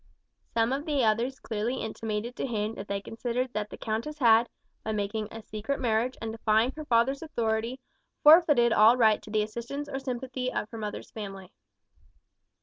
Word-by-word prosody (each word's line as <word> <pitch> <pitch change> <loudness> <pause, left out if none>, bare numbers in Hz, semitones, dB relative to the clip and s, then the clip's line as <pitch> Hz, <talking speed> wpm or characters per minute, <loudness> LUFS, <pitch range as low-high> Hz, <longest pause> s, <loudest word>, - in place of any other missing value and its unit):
Some 230 +2 +2
of 280 +3 -3
the 285 -4 +1
others 235 +4 +1
clearly 225 +3 -2
intimated 220 0 -4
to - - -2
him 215 -2 -2
that 200 -2 -8
they 200 0 -2
considered 240 +4 -3
that 210 0 -3
the - - -9
countess 230 +8 -3
had, 235 -3 +5 0.3
by 220 - -2
making 210 +1 -2
a 225 0 -8
secret 215 +8 -4
marriage 240 0 0
and 225 -1 -4
defying 220 +2 +2
her 310 0 -7
father's 255 +3 +2
authority, 230 -4 -2 0.4
forfeited 295 -7 +7
all 225 +3 +6
right 220 -3 +4
to 210 - -12
the 215 0 +1
assistance 235 +7 -5
or 270 -2 -4
sympathy 255 -1 -3
of - - -2
her 230 - -7
mother's 210 -1 -6
family. 195 -3 -8
230 Hz, 175 wpm, -28 LUFS, 215-255 Hz, 0.4 s, forfeited